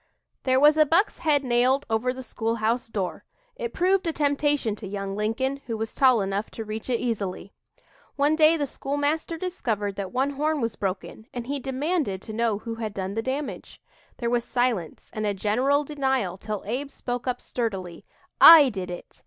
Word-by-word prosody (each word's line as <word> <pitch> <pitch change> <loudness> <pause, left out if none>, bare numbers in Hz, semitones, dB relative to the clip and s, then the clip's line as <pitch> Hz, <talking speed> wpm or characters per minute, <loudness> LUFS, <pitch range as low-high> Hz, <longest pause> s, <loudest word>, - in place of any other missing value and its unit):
There 260 0 +3
was 300 +2 +6
a 310 - +6
buck's 345 +8 +2
head 295 -3 +2
nailed 255 +2 +2
over 225 +2 0
the 260 +1 -7
school 230 -2 -2
house 230 +2 0
door. 200 -5 -4 0.3
It - - -4
proved 370 0 +1
a - - +2
temptation 290 -6 +1
to 205 - -8
young 195 0 -4
Lincoln, 235 +6 -1
who 225 -2 -2
was 220 0 -4
tall 255 -5 +4
enough 195 +2 -2
to 225 - -4
reach 215 +3 -6
it 240 - +1
easily. 200 -5 -3 0.6
One 290 +2 +3
day 315 +1 +5
the 290 - 0
schoolmaster 290 +5 -2
discovered 220 - -3
that 195 -2 -4
one 265 +3 0
horn 300 +2 0
was 230 -3 -2
broken 195 +3 -4
and 240 -1 -4
he 280 +2 -3
demanded 270 - -1
to 220 - -7
know 225 -2 +1
who 230 +2 -6
had 220 -2 -5
done 190 0 -3
the 225 - -1
damage. 270 +4 -5 0.4
There 235 -1 -2
was 240 -1 +1
silence 240 -11 -2
and 215 -2 -2
a 205 - 0
general 255 +9 +1
denial 265 -10 -1
till 210 +1 -5
Abe 255 +7 -3
spoke 245 -2 -5
up 250 - -1
sturdily: 190 -8 -4 0.5
"I 285 -4 +5
did 190 -5 -5
it. 175 - -9
245 Hz, 190 wpm, -25 LUFS, 215-285 Hz, 0.6 s, was